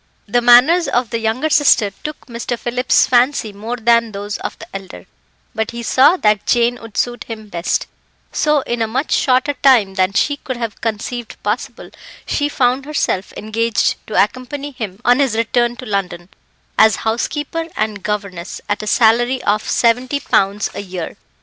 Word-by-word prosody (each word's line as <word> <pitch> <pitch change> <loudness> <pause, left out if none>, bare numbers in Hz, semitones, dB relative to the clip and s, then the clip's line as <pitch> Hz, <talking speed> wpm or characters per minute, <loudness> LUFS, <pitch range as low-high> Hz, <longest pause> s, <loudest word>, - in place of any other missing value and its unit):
The 240 +4 +2
manners 260 +8 +6
of 245 -4 0
the 230 - -1
younger 230 +8 -1
sister 270 -9 +4
took 300 0 -7
Mr. 235 0 -4
Phillips's 245 +2 +2
fancy 245 -3 +2
more 220 +4 -5
than 235 -1 +2
those 205 +1 -5
of - - -5
the - - -10
elder, 195 -1 -8 0.5
but 220 -1 -2
he 235 0 -6
saw 275 +10 +4
that 210 - +1
Jane 240 0 +2
would 225 -2 -11
suit 245 0 -1
him 220 -2 -8
best; 170 -2 -1 0.5
so, 300 -2 +2
in 240 -2 -3
a 225 - +1
much 255 +7 -2
shorter 260 +2 +2
time 245 -9 +4
than 190 0 +1
she 285 +7 +1
could 260 -3 -6
have 230 -3 -5
conceived 230 +1 -4
possible, 230 +4 -4 0.3
she 290 0 -1
found 260 -1 +1
herself 285 -10 -1
engaged 225 +1 0
to 215 - -5
accompany 255 +6 -1
him 210 -7 -6
on 245 +2 +4
his 270 -6 +1
return 240 +1 +1
to 255 - -9
London, 185 -4 -3 0.5
as 220 -1 +6
housekeeper 295 +8 -2
and 215 -2 -2
governess, 200 -4 -4
at 205 0 -1
a 215 - -6
salary 240 +3 +3
of 210 +1 +1
70 250 +4 +1
pounds 200 +2 +1
a - - -5
year. 180 -4 -6
235 Hz, 170 wpm, -18 LUFS, 210-255 Hz, 0.5 s, manners